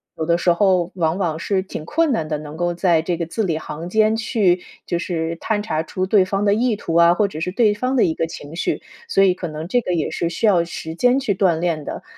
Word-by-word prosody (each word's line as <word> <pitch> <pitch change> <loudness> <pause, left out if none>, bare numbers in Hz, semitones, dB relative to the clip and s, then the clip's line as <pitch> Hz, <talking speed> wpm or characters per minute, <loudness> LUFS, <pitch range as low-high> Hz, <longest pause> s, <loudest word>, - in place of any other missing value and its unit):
有 160 - -3
的 170 0 +3
时 175 0 +3
候 180 -1 +2
往 165 -1 0
往 170 -5 -1
是 190 +2 0
挺 185 -5 -7
困 320 - +1
难 165 -9 -1
的， 155 -1 -2
能 150 0 -9
够 175 +1 -1
在 170 -2 +2
这 170 +1 -2
个 170 - -2
字 220 +7 -2
里 165 -5 0
行 160 +2 -7
间 215 +2 +3
去 205 -5 +1 0.2
就 175 - -1
是 165 -1 -2
探 210 -2 -1
查 160 -7 -1
出 185 +3 -3
对 195 0 +4
方 195 +2 -1
的 200 - +4
意 235 +1 +1
图 170 -5 -5
啊， 170 0 +6
或 205 +2 +2
者 175 -5 -7
是 180 +3 -2
对 210 +1 +3
方 255 +5 -2
的 245 - +4
一 160 - 0
个 165 - -2
情 150 -1 -9
绪， - - -2 0.3
所 195 - +3
以 185 -2 +4
可 180 -1 -5
能 155 +1 -6
这 245 +6 +1
个 180 - -2
也 155 - -1
是 170 - -1
需 195 +6 -2
要 185 -5 +4
时 160 -1 -6
间 250 +6 +3
去 255 -7 0
锻 180 -4 +2
炼 165 -4 -1
的。 - - -6
180 Hz, 285 characters per minute, -21 LUFS, 165-205 Hz, 0.3 s, 啊